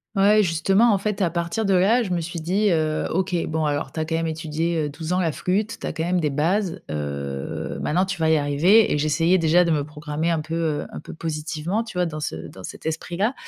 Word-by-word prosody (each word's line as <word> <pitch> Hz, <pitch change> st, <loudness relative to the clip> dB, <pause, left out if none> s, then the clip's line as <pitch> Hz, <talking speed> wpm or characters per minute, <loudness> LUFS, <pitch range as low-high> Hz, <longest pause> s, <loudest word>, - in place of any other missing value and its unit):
Ouais, 205 Hz, +2 st, +5 dB
justement, 195 Hz, +7 st, +3 dB
en -, -, +3 dB
fait, 205 Hz, +1 st, -2 dB
à 180 Hz, -, +3 dB
partir 170 Hz, +6 st, -2 dB
de 195 Hz, -, +2 dB
là, 205 Hz, +7 st, +4 dB
je 205 Hz, -, -4 dB
me 175 Hz, -1 st, 0 dB
suis 170 Hz, 0 st, -5 dB
dit, 195 Hz, +6 st, +1 dB
heu: 155 Hz, -3 st, +1 dB
«OK, 190 Hz, +2 st, -1 dB
bon 160 Hz, 0 st, -1 dB
alors 145 Hz, -2 st, -1 dB
tu 160 Hz, -, -4 dB
as -, -, +1 dB
quand 160 Hz, +1 st, -2 dB
même 165 Hz, 0 st, 0 dB
étudié, 160 Hz, +1 st, -2 dB
heu, -, -, -5 dB
12 160 Hz, +4 st, -4 dB
ans 185 Hz, -, +2 dB
la 165 Hz, -3 st, +1 dB
flûte, 210 Hz, +8 st, -1 dB
tu -, -, -4 dB
as -, -, -3 dB
quand 160 Hz, -, -2 dB
même 180 Hz, +2 st, +1 dB
des 155 Hz, -3 st, +1 dB
bases. 170 Hz, +6 st, 0 dB
Heu, 70 Hz, -2 st, -4 dB
maintenant 175 Hz, +5 st, +1 dB
tu 190 Hz, -1 st, -3 dB
vas 160 Hz, -1 st, +2 dB
y 160 Hz, -, +5 dB
arriver», 155 Hz, +9 st, +4 dB
et -, -, +2 dB
j'essayais 165 Hz, +5 st, +2 dB
déjà 165 Hz, +1 st, +4 dB
de 170 Hz, -, 0 dB
me 145 Hz, -3 st, +1 dB
programmer 150 Hz, +1 st, -3 dB
un 165 Hz, -2 st, +1 dB
peu, 155 Hz, +2 st, -5 dB, 0.3 s
heu -, -, -6 dB
un -, -, -7 dB
peu -, -, -10 dB
positivement, 160 Hz, +5 st, -3 dB
tu 215 Hz, -5 st, -8 dB
vois, 180 Hz, -, +2 dB
dans 155 Hz, -2 st, -4 dB
ce 150 Hz, -, -3 dB
dans 95 Hz, -, -12 dB
cet -, -, -10 dB
esprit-là, 175 Hz, +8 st, -1 dB
165 Hz, 255 wpm, -23 LUFS, 155-185 Hz, 0.3 s, Ouais